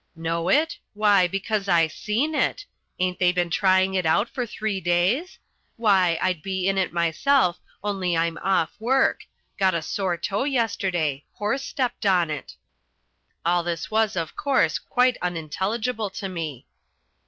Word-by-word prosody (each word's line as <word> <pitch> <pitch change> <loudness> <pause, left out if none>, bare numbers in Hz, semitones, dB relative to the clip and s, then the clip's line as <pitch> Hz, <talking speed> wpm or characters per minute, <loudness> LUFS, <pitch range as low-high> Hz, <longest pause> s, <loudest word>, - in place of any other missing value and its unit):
"Know 165 +1 -2
it? 315 - +2 0.2
Why 205 -3 +4
because 195 +2 -2
I 170 -3 +4
seen 215 - -2
it. - - 0 0.3
Ain't 180 0 -1
they 180 -1 +4
been 175 -1 -1
trying 190 +1 +3
it 185 -1 +1
out 180 +8 +2
for 245 -2 -3
three 215 -3 -3
days? 185 - +1 0.4
Why, 190 -7 +3
I'd 180 -4 0
be 190 +1 -2
in 195 0 +2
it 185 - 0
myself 175 - +2 0.2
only 190 -4 -1
I'm 165 -1 0
off 190 -4 +1
work. 265 +4 +2 0.3
Got 190 -2 +3
a 165 - -2
sore 185 0 -1
toe 200 +8 -1
yesterday 185 - -1
horse 210 +6 -1
stepped 250 -6 -2
on 175 -4 +3
it." 150 - -6 0.9
All 175 +1 +3
this 170 +2 -4
was, 220 -2 +2
of 165 -3 -3
course, 280 -2 +1
quite 250 0 +2
unintelligible 195 +7 -2
to 195 +1 -5
me. 160 -8 -5
190 Hz, 155 wpm, -24 LUFS, 170-220 Hz, 0.9 s, Why